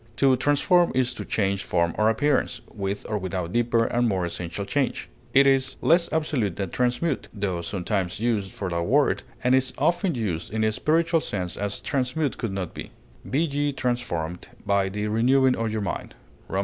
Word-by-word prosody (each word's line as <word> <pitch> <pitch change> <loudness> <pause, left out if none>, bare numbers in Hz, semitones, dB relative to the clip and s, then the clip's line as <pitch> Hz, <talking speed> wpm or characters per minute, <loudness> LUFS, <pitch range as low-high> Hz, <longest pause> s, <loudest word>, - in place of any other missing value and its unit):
To 135 -2 +4
transform 145 +7 +3
is 125 -1 +2
to - - -6
change 100 -2 0
form 85 0 +1
or 110 +1 +3
appearance, 130 0 +1
with 100 0 -3
or 105 -1 -1
without 90 -1 -3
deeper 120 -1 +2
and 120 +1 +1
more 95 -3 0
essential 85 +3 -4
change; 130 +7 -1 0.2
it 135 +3 +6
is 135 -1 +2
less 170 +1 +3
absolute 140 - 0
than 95 -3 -3
transmute, 125 +5 0
tho 95 -4 -2
sometimes 95 +1 -2
used 110 -4 0
for 100 - -5
that 85 0 0
word, 135 +11 +2 0.2
and 125 +1 +3
is 130 -1 +2
often 175 -1 +1
used 95 -9 -3
in 110 0 0
a 110 - +3
spiritual 165 +6 +2
sense 90 -8 -3
as 100 0 -3
transmute 135 +1 -1
could 115 - -2
not 95 -3 -4
be; - - -7 0.4
"Be 140 +4 +1
ye 145 -2 0
transformed 90 -11 -2 0.2
by 100 -1 +2
the 105 +2 -3
renewing 125 +5 +3
of 115 -1 -2
your 110 0 -2
mind," 100 - -4 0.3
_Rom. 95 - -1
115 Hz, 185 wpm, -25 LUFS, 95-135 Hz, 0.4 s, it